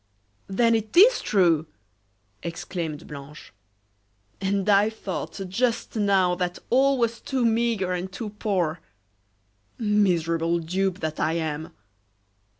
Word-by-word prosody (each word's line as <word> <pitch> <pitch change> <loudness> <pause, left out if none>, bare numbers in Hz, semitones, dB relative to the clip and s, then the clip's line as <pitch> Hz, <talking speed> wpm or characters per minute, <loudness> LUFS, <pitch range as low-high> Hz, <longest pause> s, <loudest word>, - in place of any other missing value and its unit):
"Then 230 +4 +2
it 220 +4 -2
is 465 +7 +7
true!" 170 -6 +2 0.7
exclaimed 170 -2 -5
Blanche. 145 -2 -11 0.9
"And 195 0 0
I 205 +1 +5
thought 205 -4 -6
just 235 +6 -1
now 195 -4 +3
that 180 0 -2
all 270 +2 +4
was 235 -2 0
too 260 -3 -1
meagre 225 -5 +1
and 180 +1 -4
too 210 +2 -6
poor! 185 -6 -1 1.0
Miserable 170 -6 +1
dupe 185 +3 -1
that 155 -1 -3
I 160 - +1
am! 160 -1 -3
190 Hz, 115 wpm, -25 LUFS, 170-220 Hz, 1.0 s, is